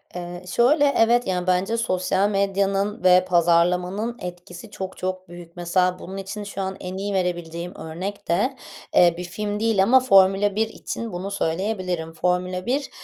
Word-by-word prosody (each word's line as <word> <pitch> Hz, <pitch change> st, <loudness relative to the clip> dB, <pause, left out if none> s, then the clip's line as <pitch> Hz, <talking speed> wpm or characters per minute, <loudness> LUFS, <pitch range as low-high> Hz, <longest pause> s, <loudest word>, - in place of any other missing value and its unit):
Eee, 175 Hz, 0 st, -6 dB
şöyle: 280 Hz, -, +3 dB
Evet, 240 Hz, +2 st, +3 dB
yani, 180 Hz, -1 st, -1 dB
bence 185 Hz, +5 st, +1 dB
sosyal 190 Hz, -2 st, +1 dB
medyanın 200 Hz, +1 st, 0 dB
ve 185 Hz, 0 st, +6 dB
pazarlamanın 180 Hz, +6 st, +2 dB
etkisi 180 Hz, +3 st, -9 dB
çok 190 Hz, 0 st, -6 dB
çok 185 Hz, -1 st, -4 dB
büyük. 175 Hz, -1 st, -12 dB
Mesela 180 Hz, +1 st, +1 dB
bunun 190 Hz, +2 st, -8 dB
için 195 Hz, +2 st, -6 dB
şu 200 Hz, -1 st, -6 dB
an 190 Hz, 0 st, -4 dB
en 185 Hz, +1 st, -6 dB
iyi 200 Hz, +1 st, -3 dB
verebileceğim 175 Hz, -2 st, -3 dB
örnek 185 Hz, +6 st, -6 dB
de, 210 Hz, +11 st, +1 dB, 0.4 s
eee, 175 Hz, -1 st, +6 dB
bir 180 Hz, -, -5 dB
film 205 Hz, +3 st, -4 dB
değil 220 Hz, -4 st, +2 dB
ama 255 Hz, +6 st, +6 dB
Formula 195 Hz, -3 st, +4 dB
1 220 Hz, +1 st, +1 dB
için 230 Hz, 0 st, -6 dB
bunu 190 Hz, +3 st, -5 dB
söyleyebilirim. 180 Hz, -2 st, -2 dB
Formula 180 Hz, +2 st, -1 dB
1, 270 Hz, +3 st, -1 dB
185 Hz, 160 wpm, -23 LUFS, 180-205 Hz, 0.4 s, ve